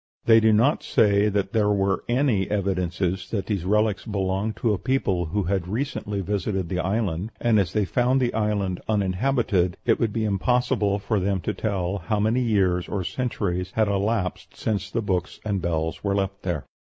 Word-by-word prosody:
They 115 -1 +7
do 110 0 +4
not 120 +8 +3
say 105 0 +3
that 100 -1 -1
there 105 -2 +3
were 100 -1 +1
any 120 -6 +1
evidences 95 -2 -1
that 100 -4 -2
these 100 -5 -2
relics 105 0 +1
belonged 100 0 -1
to 110 0 +1
a 100 - -2
people 95 -10 0
who 100 +5 -1
had 95 -1 -1
recently 105 -2 -3
visited 95 -2 -2
the 90 - -1
island; 95 0 -1
and, 115 -3 +3
as 90 -3 0
they 105 -2 +1
found 125 +5 +2
the 125 -2 0
island 105 -4 -1
uninhabited, 100 -2 +1
it 115 - +3
would 115 -3 +1
be 110 0 -1
impossible 105 0 +1
for 105 +1 -1
them 95 0 0
to - - -2
tell 100 -2 -2
how 110 0 -1
many 110 +4 +2
years 95 -7 +1
or 100 -3 -2
centuries 90 -5 -2
had 110 -1 +2
elapsed 100 -1 -1
since 100 -4 -2
the 115 +1 -2
books 90 -3 -2
and 100 -3 -1
bells 80 -1 -2
were 100 -1 0
left 95 -1 -2
there. 85 -6 -3
100 Hz, 185 wpm, -24 LUFS, 95-110 Hz, -, They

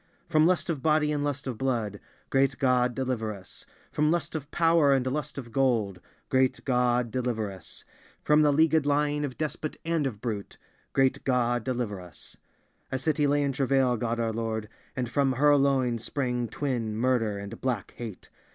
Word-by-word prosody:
From 155 +1 +4
lust 180 0 +1
of 160 -6 -2
body 155 0 +2
and 145 -1 -1
lust 145 -1 -2
of 125 -5 -4
bloodGreat 130 +2 -1
God, 125 -2 +2
deliver 125 -5 -1
us! 95 -3 -11 0.2
From 150 0 +2
lust 170 +1 0
of 150 -2 -5
power 165 -4 +4
and 130 -2 +1
lust 150 +2 -3
of 120 -4 -7
gold, 110 -8 +1 0.3
Great 130 -1 +1
God, 125 -2 +2
deliver 115 -4 -1
us! 95 -1 -11 0.4
From 150 0 +4
the 150 -1 +5
leagued 160 0 +3
lying 145 0 +1
of 135 -3 -4
despot 155 0 -3
and 165 -4 +1
of 110 -6 -6
brute, 110 -4 -5 0.4
Great 135 +1 +2
God, 120 -2 +1
deliver 120 -6 -2
us!A 90 +8 -10
city 150 +2 +1
lay 145 +1 +2
in 140 - +1
travail, 135 -1 +2
God 115 0 -2
our 115 -1 0
Lord, 110 -1 -3 0.3
and 125 -1 -2
from 135 +2 +1
her 145 +3 +5
loins 130 -4 +2
sprang 125 -4 -1
twin 115 -3 -2
Murder 115 -4 +1
and 100 +3 -8
Black 125 -7 -2
Hate. 110 -6 -8
130 Hz, 170 wpm, -27 LUFS, 115-145 Hz, 0.4 s, the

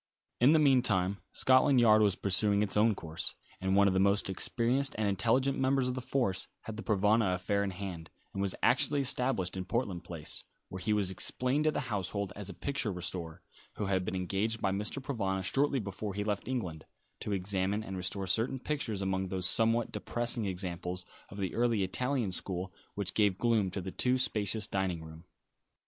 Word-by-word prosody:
In 125 +4 +6
the - - +6
meantime 110 -10 +3
Scotland 130 +1 +4
Yard 110 -2 +6
was 100 -3 +3
pursuing 100 +2 +3
its 100 - -2
own 105 +1 +4
course, 80 -3 -3 0.3
and 95 +1 +1
one 100 0 +6
of 95 - +2
the 95 - +2
most 100 0 +2
experienced 125 +8 0
and 110 -1 +1
intelligent 130 +8 +1
members 135 -1 +2
of 125 - -1
the 130 - -4
force 120 -8 0
had 110 - -7
the 110 - -6
Provana 105 -2 +2
affair 100 +3 0
in 100 - -1
hand, 90 -4 -6 0.2
and 95 - -3
was 100 -2 0
actually 145 - +3
established 125 -8 0
in 95 - -3
Portland 100 -3 -2
Place, 80 -3 -6 0.3
where 95 - -6
he 105 - -1
was 100 -3 +1
explained 130 - 0
to 155 - +4
the 145 - -2
household 100 0 -2
as 100 -1 -7
a - - -6
picture 135 -6 -2
restorer, 90 -2 -3 0.3
who 105 - -3
had 95 -1 +1
been 90 - -3
engaged 100 +5 -1
by 95 - 0
Mr. 105 +7 -2
Provana 95 -8 -2
shortly 135 +7 +1
before 100 -1 -5
he 105 - -1
left 105 -1 -2
England, 95 -12 -3 0.3
to - - -4
examine 100 +2 -1
and 95 -2 -6
restore 95 +1 -2
certain 115 +8 +1
pictures 125 -8 -3
among 95 0 -1
those 95 -1 -3
somewhat 115 +3 +2
depressing 120 -2 -2
examples 90 -1 -4 0.2
of - - -10
the 95 -3 -2
early 115 -3 +2
Italian 120 +3 -1
school 90 0 -3 0.2
which 100 -2 -2
gave 100 -3 +2
gloom 110 -4 +2
to 95 +1 -4
the 95 +1 -5
too 125 +5 +2
spacious 110 -4 -1
dining 95 -5 -2
room. 80 +1 -12
100 Hz, 190 wpm, -31 LUFS, 95-120 Hz, 0.3 s, In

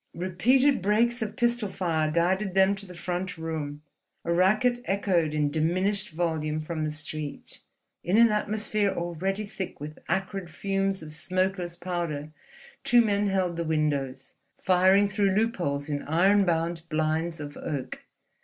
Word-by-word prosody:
Repeated 235 +10 +3
breaks 230 +5 +2
of 215 -2 -3
pistol 240 -4 +1
fire 165 -5 0
guided 185 +4 +1
them 190 +1 +5
to 200 0 -7
the 180 - -10
front 180 +1 -3
room, 155 -2 -4 0.4
a 170 - +1
racket 215 +8 +3
echoed 180 -6 +1
in 150 -1 +1
diminished 185 +6 0
volume 155 -2 -1
from 155 0 -3
the 155 - 0
street. 150 -1 -4 0.4
In 185 +5 +2
an 230 0 +7
atmosphere 210 0 0
already 190 +4 -2
thick 195 -2 -6
with 150 +1 -8
acrid 190 0 -2
fumes 195 -1 -1
of 155 - -9
smokeless 185 +1 -1
powder 170 -4 -3 0.5
two 240 0 +6
men 205 -1 +1
held 185 -3 0
the 170 - -1
windows, 145 -4 -1 0.3
firing 190 +2 +4
through 200 -1 +1
loopholes 175 -10 0
in 145 -2 -2
iron 190 +6 +3
bound 165 -1 0
blinds 160 +2 0
of 145 -1 -7
oak. 140 -4 -5
180 Hz, 145 wpm, -27 LUFS, 155-200 Hz, 0.5 s, an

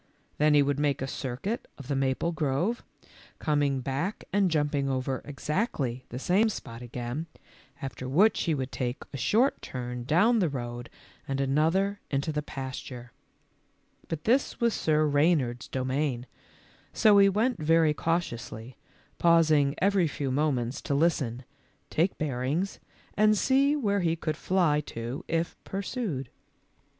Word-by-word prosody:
Then 150 0 +5
he 145 - +6
would 140 0 0
make 145 -2 +1
a - - -2
circuit 135 - -4
of 140 - -10
the 140 - -1
maple 135 +5 0
grove, 165 - -1 0.5
coming 145 -3 +1
back 140 - -3
and 200 -2 +3
jumping 145 -3 0
over 130 0 -1
exactly 145 - -2
the 125 - -6
same 190 - +3
spot 115 - -7
again, 125 +6 -5 0.6
after 130 -1 -5
which 195 +11 +4
he 160 - +1
would 130 -1 -3
take 125 0 -3
a - - -3
short 225 - +2
turn 125 -1 -5
down 210 - +4
the 180 -5 +2
road 120 -3 -5 0.4
and 135 0 -2
another 165 +9 +1
into 140 +3 -1
the 150 0 -1
pasture; 130 -3 -7 1.0
but 160 -2 -4
this 255 +5 +1
was 235 -2 +2
Sir 155 -3 +2
Reynard's 145 -5 +2
domain, 130 -1 -1 0.7
so 210 -3 +6
he 195 0 +7
went 215 0 0
very 160 0 +4
cautiously, 125 -8 -3 0.4
pausing 155 -4 +4
every 195 -3 +3
few 140 -2 -3
moments 130 -3 0
to 140 - -1
listen, 135 -6 +1 0.5
take 170 +4 +1
bearings, 145 +6 -2 0.4
and 215 0 +4
see 275 +5 +3
where 205 -8 +1
he 165 -3 +1
could 155 -2 -3
fly 155 -1 +2
to 120 +7 -5
if 165 0 -1
pursued. 195 - -4
150 Hz, 140 wpm, -28 LUFS, 130-180 Hz, 1.0 s, he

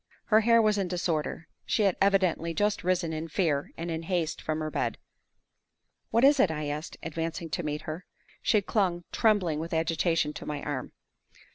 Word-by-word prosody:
Her 215 - +7
hair 230 0 +5
was 210 -1 +3
in 190 - 0
disorder; 170 -2 -2 0.2
she 215 - +1
had 195 -3 +3
evidently 185 -4 +2
just 210 +1 +1
risen 175 -2 0
in 160 +1 -4
fear 155 -4 0
and 170 +1 -4
in 160 0 -2
haste 165 -2 -1
from 155 0 -2
her 155 0 -3
bed. - - -1 1.1
"What 230 - +2
is 280 +1 +6
it?" 195 - +5
I 150 -2 -3
asked, 150 +2 -5
advancing 165 0 -4
to - - -1
meet 150 -2 -3
her. 160 +4 -6 0.3
She 210 -3 +3
clung, 185 -5 0
trembling 195 -9 +2
with 165 +1 -3
agitation, 165 -1 +1
to - - -8
my 150 -1 -4
arm. 145 -4 -4
165 Hz, 180 wpm, -28 LUFS, 155-195 Hz, 1.1 s, Her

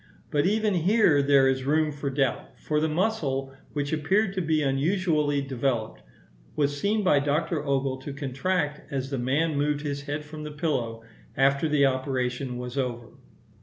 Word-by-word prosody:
But 145 +3 +2
even 215 0 +1
here 180 -4 +4
there 140 -1 +5
is 130 0 +1
room 155 +2 +2
for 145 -1 -4
doubt, 135 -2 -2
for 150 0 0
the 160 +1 +1
muscle 150 -7 -1 0.2
which 145 0 -2
appeared 190 +7 +1
to 190 - -1
be 155 -2 +1
unusually 150 0 +1
developed, 120 - -2 0.5
was 145 -1 +1
seen 210 +1 +1
by 150 -6 +4
Dr. 150 +2 0
Ogle 135 -2 0
to 130 +2 -7
contract 150 +3 -2
as 135 0 -3
the 135 - -1
man 145 +6 +1
moved 145 0 0
his 140 -1 -3
head 150 +1 -4
from 155 +1 -9
the 150 - -5
pillow, 135 -8 -2 0.3
after 140 +3 +3
the 145 -2 +4
operation 130 -1 -1
was 125 +2 -4
over. 120 -3 -3
145 Hz, 165 wpm, -26 LUFS, 135-155 Hz, 0.5 s, there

